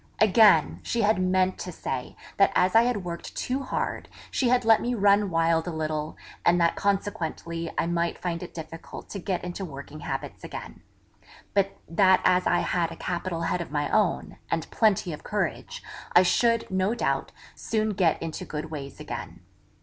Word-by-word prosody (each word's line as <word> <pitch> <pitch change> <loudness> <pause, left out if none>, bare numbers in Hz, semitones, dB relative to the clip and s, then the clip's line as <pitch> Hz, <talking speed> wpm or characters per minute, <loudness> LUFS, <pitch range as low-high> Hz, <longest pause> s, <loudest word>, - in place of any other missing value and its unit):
Again, 210 -6 +5
she 235 - -1
had 210 -2 +3
meant 185 0 +2
to 180 - -5
say 130 -6 -5 0.2
that 195 - +5
as 180 +1 +3
I 225 - +9
had 235 -5 0
worked 170 -1 -6
too 260 +2 -2
hard, 265 - -3 0.2
she 255 - +1
had 245 -1 +3
let 225 -1 +6
me 245 +1 -1
run 205 -1 +4
wild 165 0 +2
a - - -2
little; 155 -1 -3 0.3
and 175 +1 +4
that 170 -1 +3
consequently 170 -4 -2
I - - +2
might 170 0 -1
find 170 -2 -3
it 180 - -7
difficult 160 0 -9
to 200 - -4
get 180 -1 -2
into 180 +2 -5
working 145 -2 -8
habits - - -5
again; - - -8 0.7
but 195 -1 +1
that 185 +2 +4
as 180 0 +4
I 175 - +3
had 170 -2 0
a - - -7
capital 175 -1 -3
head 175 +1 0
of 170 - -6
my 145 0 -1
own, 205 -6 +1
and 165 -1 -1
plenty 200 -6 +2
of 150 - -9
courage, - - -3 0.3
I 180 - +7
should, 230 +5 +2
no 190 +4 +1
doubt, - - -1 0.2
soon 220 -1 -1
get 180 -5 +2
into 160 -1 -5
good 155 +1 -6
ways 140 -3 -7
again. - - -7
180 Hz, 180 wpm, -26 LUFS, 165-205 Hz, 0.7 s, I